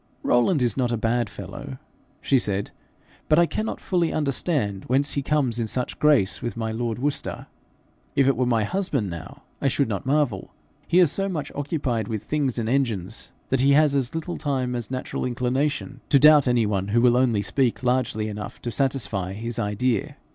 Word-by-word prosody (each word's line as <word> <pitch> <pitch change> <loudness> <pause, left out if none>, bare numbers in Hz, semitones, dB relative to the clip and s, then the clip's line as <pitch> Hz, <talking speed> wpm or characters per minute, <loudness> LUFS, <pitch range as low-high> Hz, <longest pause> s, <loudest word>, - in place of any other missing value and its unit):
'Rowland 125 +4 +3
is 120 - +1
not 125 -3 0
a 120 - 0
bad 115 0 0
fellow,' 115 +8 -8 0.4
she 135 -5 +3
said, 100 -3 -2 0.6
'but 155 - +5
I 170 - +6
cannot 215 +6 -3
fully 175 -3 0
understand 140 - -1
whence 135 +3 +2
he 140 - -1
comes 135 -5 +1
in 115 - -1
such 125 +3 -3
grace 145 -11 +3
with 120 -2 -4
my 110 -1 -2
lord 115 0 -2
Worcester. 140 +3 -2 0.7
If 135 - +4
it 135 - +3
were 125 +1 0
my 115 -3 +2
husband 135 - -1
now, 85 -1 -9 0.2
I - - +2
should 135 0 +1
not 105 +3 -4
marvel: 140 -9 0 0.3
he 175 - +2
is 175 -6 +5
so 195 0 -1
much 160 -6 -4
occupied 140 -7 -2
with 110 -3 -4
things 140 -5 -1
and 115 -2 -1
engines, 115 -6 -1 0.2
that 130 -1 +2
he 140 +1 +5
has 150 0 +4
as 135 0 -1
little 165 +2 -4
time 130 -4 -1
as 120 -3 -4
natural 130 0 -4
inclination 130 +2 -1
to 140 - +6
doubt 150 -1 +7
any 120 -2 +3
one 100 -2 -1
who 110 +3 +2
will 120 0 +5
only 120 -5 +2
speak 130 0 0
largely 125 -4 0
enough 105 -2 -6
to 120 - -3
satisfy 110 -9 -1
his 115 +3 -5
idea. 105 +2 -1
125 Hz, 190 wpm, -24 LUFS, 110-140 Hz, 0.7 s, doubt